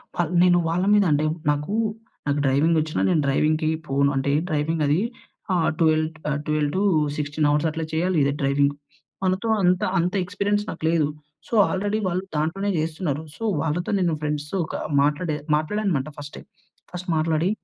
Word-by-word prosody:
Wall 175 Hz, -2 st, -1 dB
నేను 180 Hz, -1 st, +5 dB
వాళ్ళ 175 Hz, +2 st, 0 dB
మీద 205 Hz, -1 st, +5 dB
అంటే, 150 Hz, +1 st, +2 dB, 0.2 s
నాకూ, 150 Hz, +7 st, -1 dB, 0.5 s
నాకు 145 Hz, 0 st, +1 dB
డ్రైవింగ్ 145 Hz, +5 st, +3 dB
వచ్చినా 155 Hz, 0 st, -2 dB
నేను 170 Hz, -4 st, +3 dB
డ్రైవింగ్‌కి 155 Hz, +3 st, +2 dB, 0.2 s
పోను. 140 Hz, +1 st, +2 dB
అంటే 135 Hz, +1 st, 0 dB, 0.2 s
డ్రైవింగ్ 155 Hz, +1 st, 0 dB
అది 150 Hz, +4 st, +3 dB, 0.5 s
ఆహ్, 170 Hz, -3 st, +2 dB
12 155 Hz, -1 st, +3 dB, 0.2 s
ఆహ్, 145 Hz, -1 st, -1 dB
12-16 150 Hz, -2 st, 0 dB
అవర్స్ 150 Hz, +2 st, +2 dB
అట్లా 160 Hz, +1 st, -4 dB
చేయాలి 175 Hz, +2 st, +1 dB
ఇదే 140 Hz, 0 st, +1 dB
డ్రైవింగ్. 140 Hz, +1 st, +2 dB, 0.5 s
మనతో 190 Hz, +4 st, 0 dB
అంత 180 Hz, 0 st, +3 dB, 0.2 s
అంత 175 Hz, +1 st, 0 dB
ఎక్స్పీరియన్స్ 205 Hz, +2 st, -1 dB
నాకు -, -, -7 dB
లేదు. 165 Hz, -3 st, +2 dB, 0.4 s
సో, -, -, -12 dB, 0.2 s
ఆల్రెడీ 205 Hz, +3 st, -1 dB
వాళ్ళు 180 Hz, +1 st, -1 dB
దాంట్లోనే 175 Hz, +7 st, -1 dB
చేస్తున్నారు. 155 Hz, -1 st, -2 dB
సో, -, -, -7 dB, 0.2 s
వాళ్ళతో 160 Hz, +5 st, -1 dB
నేను 175 Hz, -3 st, +1 dB
ఫ్రెండ్స్‌తో 150 Hz, +2 st, -3 dB
ఒక -, -, -6 dB, 0.3 s
మాట్లాడే 150 Hz, +2 st, 0 dB, 0.2 s
మాట్లాడాను 200 Hz, +8 st, -1 dB
అనమాట 155 Hz, -6 st, 0 dB
ఫస్టే. 145 Hz, 0 st, -9 dB, 0.5 s
ఫస్ట్ 180 Hz, 0 st, -7 dB
మాట్లాడి, 160 Hz, +2 st, +1 dB
155 Hz, 155 wpm, -23 LUFS, 150-180 Hz, 0.5 s, నేను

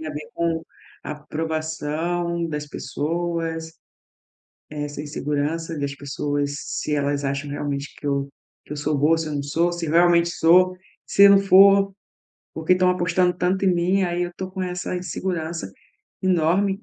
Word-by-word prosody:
tem 160 Hz, -, -6 dB
a -, -, -3 dB
ver 150 Hz, 0 st, -7 dB
com 165 Hz, -1 st, -1 dB, 0.4 s
aprovação 160 Hz, +3 st, -3 dB
das 150 Hz, -1 st, -4 dB
pessoas, 165 Hz, +3 st, -3 dB, 1.0 s
essa 145 Hz, -1 st, -5 dB
insegurança 150 Hz, +2 st, -3 dB
das 140 Hz, -1 st, -2 dB
pessoas 145 Hz, 0 st, -2 dB
se 150 Hz, -, -3 dB
elas 145 Hz, 0 st, -1 dB
acham 140 Hz, +1 st, -2 dB
realmente 145 Hz, 0 st, -4 dB
que 145 Hz, -, -9 dB
eu 140 Hz, 0 st, 0 dB, 0.4 s
que -, -, -9 dB
eu -, -, -4 dB
sou 145 Hz, 0 st, -1 dB
boa, 155 Hz, +3 st, +4 dB
se 160 Hz, -1 st, -3 dB
eu -, -, -5 dB
não 140 Hz, -, -2 dB
sou, 170 Hz, +5 st, +1 dB
se 175 Hz, -1 st, -4 dB
realmente 170 Hz, +1 st, +4 dB
sou, 180 Hz, +2 st, +4 dB, 0.3 s
se 200 Hz, -, +3 dB
eu 200 Hz, -, +9 dB
não 200 Hz, -, +7 dB
for, 195 Hz, 0 st, +6 dB, 0.6 s
por 160 Hz, -, -7 dB
que 180 Hz, -, +4 dB
estão 185 Hz, 0 st, +4 dB
apostando 180 Hz, 0 st, +2 dB
tanto 180 Hz, +2 st, 0 dB
em 185 Hz, -, +4 dB
mim, 180 Hz, +3 st, +2 dB
aí 175 Hz, 0 st, 0 dB
eu 175 Hz, -, -3 dB
tô 185 Hz, 0 st, -5 dB
com 190 Hz, 0 st, -6 dB
essa 180 Hz, 0 st, -3 dB
insegurança 170 Hz, -, -4 dB, 0.5 s
enorme. 190 Hz, +3 st, +1 dB
165 Hz, 165 wpm, -23 LUFS, 150-180 Hz, 1.0 s, eu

